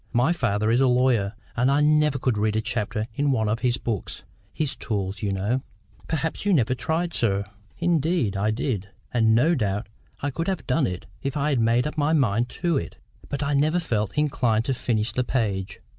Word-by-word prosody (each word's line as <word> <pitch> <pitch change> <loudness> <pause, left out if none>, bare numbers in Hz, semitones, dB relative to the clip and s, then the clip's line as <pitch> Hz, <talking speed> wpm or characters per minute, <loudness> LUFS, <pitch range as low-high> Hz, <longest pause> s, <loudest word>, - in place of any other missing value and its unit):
My 125 +8 +3
father 110 -8 0
is 120 +3 +3
a 135 - +5
lawyer, 125 -5 +2 0.2
and 125 +3 +2
I 140 +1 +3
never 150 -1 +3
could 125 -2 0
read 105 +1 0
a - - +2
chapter 110 -1 -2
in 145 +5 0
one 110 -5 +1
of 110 +2 0
his 125 -1 +1
books—his 120 - -4
tools, 100 -3 -3
you 100 - -1
know." 100 +7 0 0.5
"Perhaps 160 0 -2
you 205 -1 +2
never 130 -6 +3
tried, 160 +8 -1
sir." 100 -3 +1 0.3
"Indeed, 165 - +1
I 100 +2 +1
did; 110 -3 -2 0.2
and 110 -2 +4
no 150 +9 +4
doubt 105 - -1 0.3
I 145 - -2
could 165 +5 -3
have 190 -7 -2
done 140 +1 +2
it 90 -1 -5 0.2
if 140 +1 -2
I 145 +1 +1
had 135 -4 +1
made 115 +2 +3
up 150 +1 -3
my 150 +2 +2
mind 120 -5 +2
to 170 -4 +2
it. - - -8 0.3
But 140 0 -2
I 140 +1 0
never 155 +4 +2
felt 110 - -1
inclined 120 -7 +1
to 135 - +1
finish 115 -3 0
the 125 - 0
page. 100 -6 -2
125 Hz, 205 wpm, -25 LUFS, 110-145 Hz, 0.5 s, a